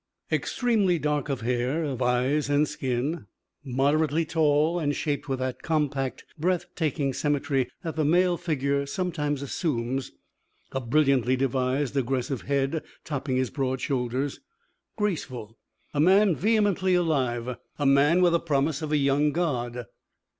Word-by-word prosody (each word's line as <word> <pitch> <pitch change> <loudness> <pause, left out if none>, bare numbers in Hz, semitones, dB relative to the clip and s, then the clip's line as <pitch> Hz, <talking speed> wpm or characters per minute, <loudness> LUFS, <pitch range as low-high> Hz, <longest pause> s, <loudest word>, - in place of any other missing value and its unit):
V - - +4
Extremely 215 -8 +1
dark 150 -1 -1
of 135 -4 -2
hair, 125 +6 0
of 135 -4 -3
eyes 130 +4 +1
and 145 +1 +3
skin, 140 +2 -2 0.4
moderately 145 +4 +1
tall, 155 +1 +2
and 145 -3 0
shaped 145 -2 -2
with 135 - 0
that 130 0 -3
compact, 145 -5 -1
breath 175 +2 +1
taking 145 -4 -1
symmetry 145 -2 0
that 165 - -4
the 155 - +1
male 175 +4 +3
figure 140 -4 -1
sometimes 150 -4 -2
assumes, 135 -4 -2 0.6
a 135 - -2
brilliantly 130 -1 +2
devised, 130 +1 0
aggressive 130 -1 -1
head 140 +3 0 0.2
topping 140 -3 -3
his 130 -1 0
broad 130 -2 -1
shoulders, 130 +1 -2 0.6
graceful, 130 - -3 0.3
a 145 - -1
man 190 +3 +5
vehemently 200 -2 +2
alive, 125 -8 0 0.2
a 145 - -1
man 145 +6 +5
with 175 - +5
the 170 - +3
promise 145 -2 0
of 155 -1 -4
a 150 - +3
young 145 +1 +2
God. 125 -8 -2
145 Hz, 140 wpm, -26 LUFS, 130-160 Hz, 0.6 s, man